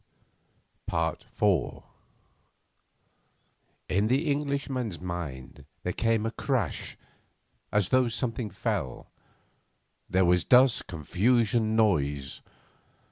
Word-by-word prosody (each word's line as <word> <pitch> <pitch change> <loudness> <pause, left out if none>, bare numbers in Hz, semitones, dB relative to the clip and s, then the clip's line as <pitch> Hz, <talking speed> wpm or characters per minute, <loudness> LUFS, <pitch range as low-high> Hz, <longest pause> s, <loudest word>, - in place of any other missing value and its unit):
IV 80 - 0 2.0
In 100 +4 +1
the 140 +6 +1
Englishman's 140 - -2
mind 85 -8 -6 0.2
there 90 - -2
came 115 -1 +1
a 115 - -1
crash, 120 - -2 0.7
as 105 -3 +2
though 130 -1 +4
something 115 -1 -2
fell. 95 - -3 1.0
There 95 0 +3
was 90 0 +3
dust, 125 0 +5
confusion, 110 - +1
noise. 75 -11 +1
105 Hz, 80 wpm, -28 LUFS, 85-120 Hz, 2.0 s, dust